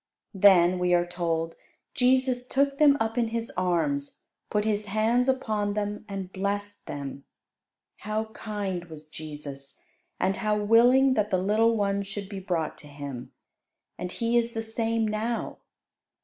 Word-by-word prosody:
Then, 185 -2 +5
we 180 0 +3
are 175 0 +2
told, 165 -2 -2 0.4
Jesus 255 -1 +2
"took 275 +1 +1
them 290 -2 +6
up 225 +1 0
in 235 - +2
His 230 0 -3
arms, 160 -6 -1 0.3
put 210 0 0
His 210 -1 0
hands 225 +5 +2
upon 215 -6 0
them, 210 0 -3
and 195 -2 -5
blessed 205 +1 -3
them." 140 -1 -6 0.7
How 215 +2 -2
kind 200 -5 -4
was 155 -2 -11
Jesus! 145 -3 -8 0.4
and 190 +1 +1
how 215 -2 0
willing 245 +5 +5
that 210 -3 +1
the 190 - +2
little 220 +5 +2
ones 200 -1 0
should 200 -1 -6
be 200 -2 -5
brought 175 -4 -2
to 150 - -13
Him! 140 -4 -7 0.7
And 180 - -4
He 235 +2 +1
is 235 0 -2
the 225 - -2
same 225 0 0
now. 220 +2 -2
205 Hz, 150 wpm, -27 LUFS, 180-225 Hz, 0.7 s, them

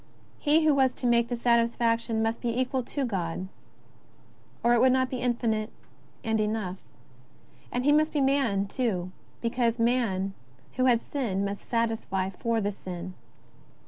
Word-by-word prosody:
He 310 +2 +3
who 305 - +5
was 265 -2 +3
to - - -6
make 235 -1 +3
the 245 - -2
satisfaction 230 -1 +2
must 225 +1 -1
be 240 +1 -1
equal 260 0 0
to 270 +3 -3
God, 185 -4 -3 1.2
or 240 0 +5
it 240 - +4
would 260 - +6
not 260 0 +1
be 255 - -2
infinite 230 -3 0 0.5
and 220 -1 0
enough; 210 -3 -2 0.9
and 245 +1 -1
He 290 - +5
must 310 +1 +3
be 300 - 0
man, 265 -8 +2
too, 195 -7 -2 0.3
because 235 0 0
man 230 -5 +1 0.4
who 255 - +3
had 240 -3 +3
sinned 205 -9 -2
must 200 0 -5
satisfy 225 -5 -1
for 230 +4 -1
sin. 185 -2 -7
230 Hz, 150 wpm, -27 LUFS, 210-255 Hz, 1.2 s, would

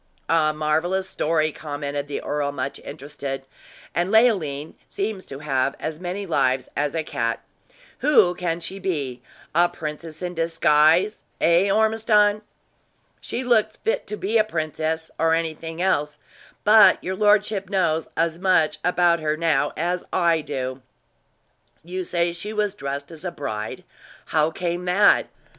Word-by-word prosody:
"A 160 -2 +3
marvelous 160 +5 0
story," 155 -2 0
commented 145 -1 -5
the 145 - -4
earl, 145 -1 -1
much 140 -1 -4
interested. 135 -1 -7 0.5
"And 175 +3 0
Leoline 175 - +2
seems 200 -1 -4
to 135 - -7
have 135 -1 +1
as 155 0 -4
many 185 +3 -4
lives 135 -6 +1
as 145 +1 -1
a 160 - 0
cat! 115 -5 -2 0.6
Who 230 -12 +4
can 175 -1 -3
she 195 +3 -6
be 145 -10 -3 0.3
a 175 +2 +4
princess 155 0 -7
in 180 0 -3
disguise 165 +3 +3 0.2
eh, 170 +4 +4
Ormiston?" 215 0 +3 0.8
"She 255 - -4
looks 220 -3 +2
fit 450 +3 -2
to 210 - -5
be 220 +4 +1
a - - +5
princess, 160 -3 -3
or 165 0 +3
anything 165 +1 -3
else; 150 -5 0 0.5
but 215 +1 +7
your 185 +1 -2
lordship 210 -1 +2
knows 170 -5 +1
as 165 0 0
much 185 -4 +2
about 175 -1 +3
her, 155 -1 -1
now, 155 -3 +1
as 175 +2 -1
I 170 -3 +2
do." 130 -2 -4 1.0
"You 185 +2 -4
say 170 -1 0
she 205 +5 -6
was 210 -2 0
dressed 140 -4 -5
as 160 0 -11
a 180 - -2
bride 110 -10 -5 0.5
how 155 -1 +3
came 175 +1 -3
that?" 195 +3 +4
165 Hz, 145 wpm, -23 LUFS, 150-190 Hz, 1.0 s, but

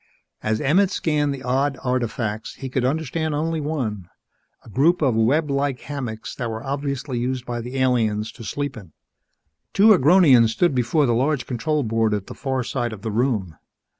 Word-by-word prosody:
As 110 0 0
Emmett 180 +8 +3
scanned 150 -6 0
the 135 -1 -6
odd 135 +2 0
artifacts, 120 -4 -2
he 135 - -6
could 130 0 -1
understand 155 +3 -1
only 160 +1 -1
one 115 - -3 0.6
a - - -13
group 160 - +3
of 130 -4 +3
web 140 +7 +2
like 140 -2 -1
hammocks 125 -7 -5
that 120 -3 -4
were 110 +1 -5
obviously 140 -2 -3
used 125 +1 -2
by 120 -1 -4
the 125 +3 -6
aliens 110 -5 +1
to 115 - -12
sleep 140 +4 -3
in. 95 -9 -12 0.8
Two 205 +3 +6
Agronians 145 - +6
stood 145 +9 +1
before 130 +4 +2
the 120 - +2
large 135 +4 0
control 145 +4 -1
board 110 -1 +1
at 100 -2 -4
the - - -9
far 130 -2 -2
side 120 -1 -2
of 105 -2 -10
the 110 - -2
room. 105 - -1
130 Hz, 180 wpm, -22 LUFS, 115-145 Hz, 0.8 s, Two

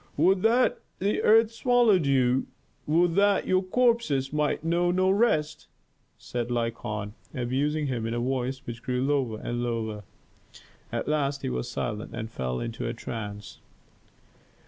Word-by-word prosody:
"Would 185 +5 +4
that 235 +4 +3 0.2
the 200 +3 0
earth 225 +1 +5
swallowed 230 - +3
you! 130 -1 +2 0.4
Would 165 +3 +3
that 200 -1 +3
your 185 0 +2
corpses 190 - +1
might 150 0 0
know 170 +2 +1
no 185 +1 +2
rest!" 155 -8 +1 0.5
said 120 -1 -4
Lykon, 115 -3 -3 0.2
abusing 140 +5 0
him 120 -5 -2
in 115 - -2
a - - -1
voice 130 +2 -2
which 120 -1 -7
grew 125 0 -1
lower 135 -6 0
and 120 0 -3
lower. 115 -3 -2 0.9
At - - -3
last 145 -2 0
he - - -1
was 60 0 -3
silent 105 +1 -4
and 110 -1 -5
fell 65 - -3
into 115 -1 -4
a 115 - -3
trance. 105 -3 -7
135 Hz, 145 wpm, -27 LUFS, 115-180 Hz, 0.9 s, earth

